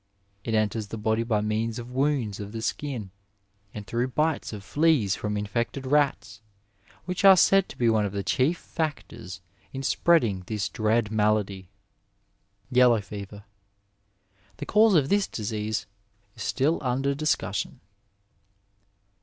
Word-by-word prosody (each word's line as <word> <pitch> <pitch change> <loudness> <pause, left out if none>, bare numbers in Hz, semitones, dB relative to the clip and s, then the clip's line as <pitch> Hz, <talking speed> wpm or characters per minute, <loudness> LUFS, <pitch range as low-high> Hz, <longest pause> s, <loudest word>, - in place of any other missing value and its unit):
It 115 - -1
enters 110 0 0
the 110 - -6
body 110 +1 0
by 115 -3 0
means 110 +1 -1
of 120 0 -8
wounds 130 -6 0
of 105 +1 -7
the 110 -1 -5
skin, 125 -11 -4 0.6
and 105 -1 -8
through 120 +4 -1
bites 150 +4 -1
of 105 -3 -8
fleas 145 - +2
from 105 0 -3
infected 115 +6 -3
rats, 130 -6 0 0.6
which 180 +1 -3
are 195 -1 +9
said 195 +2 +4
to - - -11
be 120 - +2
one 110 -2 +3
of 100 - -2
the 100 0 -3
chief 130 - +1
factors 115 - -5 0.3
in 135 0 -6
spreading 125 - +2
this 105 -3 -2
dread 110 -1 0
malady. 105 -3 0 1.0
Yellow 125 -2 +5
Fever. 100 0 -9 0.6
— 100 -1 -37
^The 145 - -6
cause 210 +3 +4
of 145 -4 +3
this 200 -1 +2
disease 105 -2 -3 0.5
is - - -11
still 150 +5 +1
under 135 +1 0
discussion. 155 +1 -2
115 Hz, 145 wpm, -26 LUFS, 105-140 Hz, 1.0 s, are